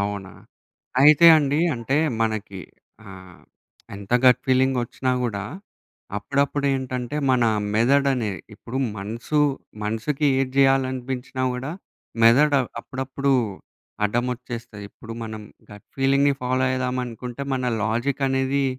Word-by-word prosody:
అవునా? 100 -1 -4 0.7
అయితే 155 +3 +7
అండి. 145 +1 0
అంటే 120 +4 -2 0.3
మనకి 110 -4 -3 0.5
ఆహ్, 95 -2 -13 0.5
ఎంత 100 +3 -8
గట్ 125 -1 +6
ఫీలింగొచ్చినా 130 -1 +1
గూడా 100 -5 -2 0.7
అప్పుడప్పుడేంటంటే 135 +1 -1
మన 125 -2 +3 0.3
మెదడనేది 125 -3 +2
ఇప్పుడు 115 +4 -8 0.2
మనసు, 115 +9 -2 0.4
మనుసుకి 115 +8 -1
ఏటి 130 -1 -1
జేయాలనిపించినా 130 -1 +1
గూడా 130 +4 -5 0.5
మెదడు 140 +5 +5 0.2
అప్పుడప్పుడు 135 +2 -2 0.7
అడ్డమొచ్చేస్తది. 120 -1 -3
ఇప్పుడు 115 - -11
మనం 110 -1 -7 0.3
గట్ 105 0 -13
ఫీలింగ్‌ని 140 +1 +3
ఫాలో 130 +1 0
అయేదామనుకుంటే 125 0 -3
మన 130 -1 -2 0.2
లాజికనేది 135 +4 0
130 Hz, 95 wpm, -23 LUFS, 115-135 Hz, 0.7 s, అయితే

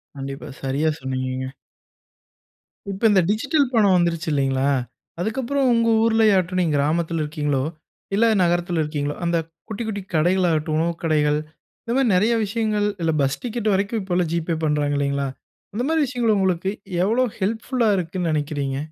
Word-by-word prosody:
கண்டிப்பா. 135 0 -6
சரியா 140 +4 0
சொன்னீங்கங்க! 130 0 -3 1.4
இப்ப, 195 - -7
இந்த 190 -2 +5
டிஜிட்டல் 275 +6 +2
பணம் 200 -5 +4
வந்துருச்சு 170 -2 0
இல்லைங்களா? 135 -1 +1 0.5
அதுக்கப்புறம் 260 +6 0
உங்க 230 0 +2
ஊர்ல 225 -1 +3
ஆகட்டும், 185 -1 +1
நீங்க 160 -4 +1
கிராமத்தில 165 +2 0
இருக்கீங்ளோ, 150 -3 -1 0.5
இல்ல 230 - +4 0.2
நகரத்தில 175 -1 +1
இருக்கீங்ளோ, 145 -1 -3
அந்த 170 0 +1 0.3
குட்டி 215 +2 -4
குட்டி 205 -2 -3
கடைகள் 180 +3 +3
ஆகட்டும், 155 -1 0
உணவு 170 +1 +1
கடைகள்! 150 -2 +2 0.4
இந்த 230 - -3
மாரி 270 -4 +3
நெறைய 215 +6 +3
விஷயங்கள்! 210 -1 0
இல்ல 165 - +2
பஸ் 135 +1 0
டிக்கெட் 230 -3 -1
வரைக்கும் 205 +3 0
இப்பல்லாம் 180 -3 -1
ஜி.பே 170 0 -1
பண்றாங்க 145 -1 +1
இல்லைங்களா? 140 0 0 0.5
அந்த 240 - -1
மாரி 320 -1 +2
விஷயங்கள் 240 -4 +1
உங்களுக்கு 190 -1 +1 0.4
எவ்ளோ 240 +5 +2
ஹெல்ப்ஃபுல்லா 225 +4 0
இருக்குன்னு 175 -1 -2
நெனைக்கிறீங்க? 145 -3 -2
175 Hz, 145 wpm, -22 LUFS, 150-215 Hz, 1.4 s, இந்த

